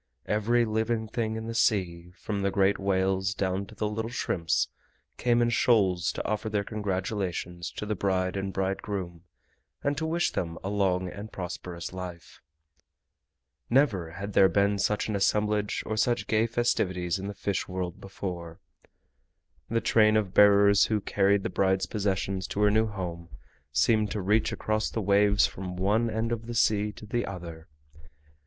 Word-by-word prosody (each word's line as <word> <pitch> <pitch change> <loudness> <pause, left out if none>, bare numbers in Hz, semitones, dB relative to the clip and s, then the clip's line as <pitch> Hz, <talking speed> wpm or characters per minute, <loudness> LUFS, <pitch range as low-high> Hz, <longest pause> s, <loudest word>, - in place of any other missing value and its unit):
Every 115 +3 +2
living 110 +1 -1
thing 110 0 -2
in 110 0 -5
the 115 - -4
sea, 90 -7 0
from 105 -2 -3
the 100 - +1
great 100 0 +2
whales 95 0 0
down 95 +1 -1
to - - -13
the 105 - -1
little 110 +2 -3
shrimps, 85 -8 0 0.5
came 120 -1 +2
in 120 - +1
shoals 95 -8 +3
to - - -4
offer 110 +1 -2
their 105 -1 0
congratulations 95 -4 -3
to - - -5
the 105 - -1
bride 95 -2 0
and 95 0 -2
bridegroom 95 -2 -3 0.6
and 140 +1 +1
to 160 - -2
wish 170 +2 +1
them 85 -2 -3
a 95 - -3
long 95 -3 +1
and 100 +4 -8
prosperous 90 -1 -6
life. 90 -2 -8 1.3
Never 105 - +2
had 100 +3 -6
there 95 0 +6
been 100 +3 +2
such 105 +1 0
an 105 - -2
assemblage 105 +1 +1
or 110 - -2
such 120 0 +1
gay 110 +2 +2
festivities 95 -7 0
in 95 - -5
the 100 - -6
Fish 100 -1 -2
World 90 -1 -4
before. 90 -3 -6 1.1
The 115 0 +1
train 110 -1 +4
of 100 -4 -1
bearers 100 0 +6
who 110 -1 0
carried 100 0 +2
the - - -1
bride's 95 0 +1
possessions 95 -2 -2
to 105 - -3
her 105 0 +5
new 110 +1 +3
home 85 -5 -6 0.4
seemed 105 +10 +2
to 105 - -2
reach 105 +4 +2
across 110 0 -1
the - - -3
waves 100 0 +4
from 90 -1 -5
one 105 +5 +1
end 110 +1 -2
of 115 -1 -3
the 120 - -5
sea 105 -2 +2
to 105 - -11
the 120 +3 -1
other. 85 -4 -8
100 Hz, 170 wpm, -28 LUFS, 95-110 Hz, 1.3 s, there